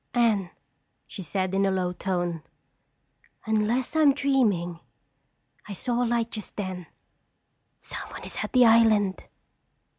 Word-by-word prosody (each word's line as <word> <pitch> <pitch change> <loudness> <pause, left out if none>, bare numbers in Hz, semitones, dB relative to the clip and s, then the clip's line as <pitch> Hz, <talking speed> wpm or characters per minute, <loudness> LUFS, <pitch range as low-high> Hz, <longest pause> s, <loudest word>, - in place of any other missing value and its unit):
"Anne," 220 -6 +2 0.6
she - - -8
said 185 +1 -2
in 195 +1 +2
a 195 - +3
low 185 -2 -1
tone, 175 -3 -2 1.0
"unless 220 +5 0
I'm 295 -3 +5
dreaming, 215 -12 +1 0.9
I 205 - -6
saw 240 +4 -1
a - - 0
light 235 -1 0
just 215 -3 -7
then. 185 -4 -5 0.9
Someone - - -7
is - - -7
at - - -4
the 250 -1 +6
island." 220 -4 +4
210 Hz, 125 wpm, -26 LUFS, 185-235 Hz, 1.0 s, the